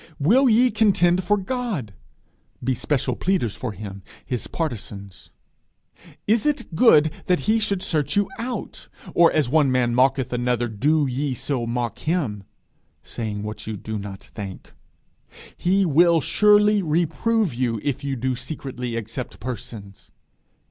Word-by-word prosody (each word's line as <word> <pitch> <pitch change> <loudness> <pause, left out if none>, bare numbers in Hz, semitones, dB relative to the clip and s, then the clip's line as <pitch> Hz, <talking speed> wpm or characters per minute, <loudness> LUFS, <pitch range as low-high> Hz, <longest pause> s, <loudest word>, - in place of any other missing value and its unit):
_ - - -20 0.2
'Will 245 - +4
ye 240 +3 +4
contend 185 -4 +3
for 210 +4 +2
God?' 200 - -3 0.7
be 130 +1 +1
special 130 0 -1
pleaders 170 - 0
for 125 - -4
him, 100 -1 -8 0.2
his 125 -2 -3
partisains? 105 - -6 1.0
'Is 220 +5 +2
it 295 - -2
good 160 -6 +5 0.2
that 180 -1 +2
He 220 +1 +2
should 200 -3 -1
search 155 +2 -1
you 205 -1 +2
out? 245 +2 -6 0.2
or 170 -1 +5
as 150 -5 +1
one 145 0 +3
man 125 -2 +2
mocketh 130 0 +2
another, 120 -1 0
do 145 +8 +1
ye 135 +1 -2
so 125 -1 -2
mock 120 0 -2
Him?' 135 - -2 0.6
saying 105 -3 -5
what 105 +1 -7
you 110 -1 -4
do 110 +2 -5
not 100 -1 -8
think? 100 -3 -8 0.8
'He 195 +2 +2
will 170 +1 +4
surely 210 +6 +4
reprove 175 - +1
you, 120 -2 -1
if 140 0 -2
ye 140 -1 -2
do 130 +1 -1
secretly 125 -3 -5
accept 115 +3 -6
persons!' 110 -4 -8
140 Hz, 145 wpm, -23 LUFS, 120-185 Hz, 1.0 s, good